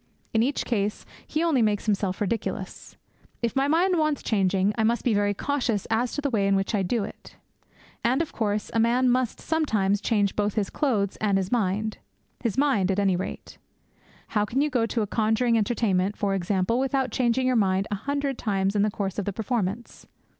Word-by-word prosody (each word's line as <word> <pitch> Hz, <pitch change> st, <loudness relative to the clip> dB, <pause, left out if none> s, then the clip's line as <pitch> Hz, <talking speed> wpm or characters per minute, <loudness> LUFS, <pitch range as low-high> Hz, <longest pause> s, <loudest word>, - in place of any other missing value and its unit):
In 220 Hz, -, +3 dB
each 265 Hz, +4 st, 0 dB
case 210 Hz, -3 st, -1 dB, 0.2 s
he 310 Hz, +2 st, -1 dB
only 315 Hz, -7 st, +2 dB
makes 210 Hz, -2 st, +1 dB
himself 200 Hz, -3 st, 0 dB
ridiculous. 210 Hz, +2 st, -4 dB, 0.5 s
If 235 Hz, -, 0 dB
my 270 Hz, +1 st, +2 dB
mind 345 Hz, +3 st, +3 dB
wants 305 Hz, -2 st, 0 dB
changing, 195 Hz, -1 st, +1 dB
I 220 Hz, -, 0 dB
must 235 Hz, +2 st, +1 dB
be 240 Hz, -, +2 dB
very 205 Hz, 0 st, +1 dB
cautious 250 Hz, -5 st, -1 dB
as 235 Hz, +2 st, +1 dB
to 290 Hz, -, -2 dB
the 285 Hz, -, 0 dB
way 200 Hz, -4 st, +1 dB
in 200 Hz, -, +3 dB
which 195 Hz, +3 st, -1 dB
I 205 Hz, -, +2 dB
do 205 Hz, +4 st, 0 dB
it. -, -, -10 dB, 0.7 s
And, 250 Hz, +4 st, +2 dB
of 330 Hz, -, -2 dB
course, 210 Hz, -2 st, -1 dB
a 230 Hz, -, +2 dB
man 245 Hz, +2 st, +3 dB
must 250 Hz, -2 st, 0 dB
sometimes 215 Hz, -11 st, 0 dB
change 205 Hz, -4 st, +1 dB
both 205 Hz, -1 st, 0 dB
his 205 Hz, -3 st, -1 dB
clothes 215 Hz, -10 st, 0 dB
and 205 Hz, -2 st, +1 dB
his 190 Hz, 0 st, -2 dB
mind 215 Hz, -1 st, 0 dB, 0.4 s
his 230 Hz, -1 st, -2 dB
mind 265 Hz, -10 st, +2 dB
at 195 Hz, -, +1 dB
any 195 Hz, -2 st, +2 dB
rate. 180 Hz, -, -6 dB, 0.7 s
How 210 Hz, -2 st, +1 dB
can 230 Hz, +5 st, -1 dB
you 295 Hz, +1 st, +1 dB
go 235 Hz, -3 st, +1 dB
to 230 Hz, -1 st, -1 dB
a -, -, 0 dB
conjuring 220 Hz, +3 st, +1 dB
entertainment, 205 Hz, -3 st, +1 dB
for 200 Hz, -1 st, 0 dB
example, 195 Hz, +4 st, 0 dB
without 270 Hz, -1 st, 0 dB
changing 255 Hz, 0 st, +1 dB
your 255 Hz, 0 st, +2 dB
mind 195 Hz, -2 st, +2 dB
a -, -, +1 dB
hundred 280 Hz, +4 st, -2 dB
times 195 Hz, -2 st, 0 dB
in 205 Hz, -, +3 dB
the 210 Hz, -, +3 dB
course 200 Hz, -1 st, -3 dB
of 200 Hz, -, -2 dB
the 205 Hz, -, -2 dB
performance? 220 Hz, 0 st, -3 dB
220 Hz, 205 wpm, -25 LUFS, 200-250 Hz, 0.7 s, In